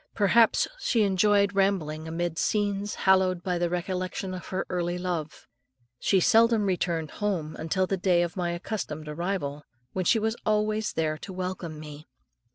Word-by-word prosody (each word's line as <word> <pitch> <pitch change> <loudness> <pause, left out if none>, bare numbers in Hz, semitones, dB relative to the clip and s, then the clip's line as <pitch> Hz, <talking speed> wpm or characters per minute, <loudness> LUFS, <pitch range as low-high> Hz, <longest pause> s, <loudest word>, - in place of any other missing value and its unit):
Perhaps 225 +2 +4
she 230 - +2
enjoyed 200 +1 +3
rambling 170 -6 0
amid 165 0 -2
scenes 205 -1 0
hallowed 185 -2 +4
by 180 -2 -1
the 175 0 +1
recollection 185 +1 -3
of 180 -2 -7
her 190 0 -2
early 175 -1 -2
love. 175 -4 -4 0.5
She 195 - +3
seldom 225 +2 +4
returned 170 -4 -1
home 180 -7 -2
until 185 +4 0
the 195 +1 -1
day 175 -1 +3
of 175 - -4
my 175 -2 -1
accustomed 170 -4 -4
arrival, 150 -3 -3 0.3
when 185 -1 -2
she 225 - +4
was 220 +1 0
always 215 0 0
there 155 -1 -1
to - - -8
welcome 180 -4 -5
me. 150 0 -10
185 Hz, 160 wpm, -27 LUFS, 170-200 Hz, 0.5 s, Perhaps